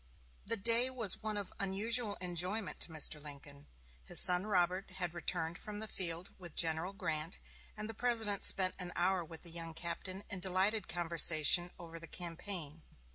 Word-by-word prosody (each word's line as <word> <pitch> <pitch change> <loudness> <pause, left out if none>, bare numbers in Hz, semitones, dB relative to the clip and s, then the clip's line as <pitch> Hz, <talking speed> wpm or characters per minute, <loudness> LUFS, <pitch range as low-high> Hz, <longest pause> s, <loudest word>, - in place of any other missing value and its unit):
The 230 +2 0
day 230 +4 +4
was 230 -7 0
one 215 -1 -3
of 200 -2 -6
unusual 205 +3 +2
enjoyment 180 +4 -1
to - - +1
Mr. 155 -1 +2
Lincoln. 145 -1 -10 0.4
His - - +8
son 180 +3 +6
Robert 185 -1 0
had 180 -3 -1
returned 170 -1 -2
from 210 -1 -6
the 220 +1 -5
field 175 -2 -4
with 175 -4 -11
General 165 +2 0
Grant, 165 -4 -4 0.4
and 215 0 -5
the 225 - -6
President 225 -3 +1
spent 185 -1 +4
an 180 -1 -6
hour 180 0 +1
with 160 -1 -11
the 170 - -4
young 165 -1 -6
captain 185 +3 -4
in 185 - -5
delighted 190 +3 +1
conversation 170 0 +3
over 165 -1 -9
the 165 - -10
campaign. 170 -2 -7
180 Hz, 170 wpm, -34 LUFS, 165-205 Hz, 0.4 s, His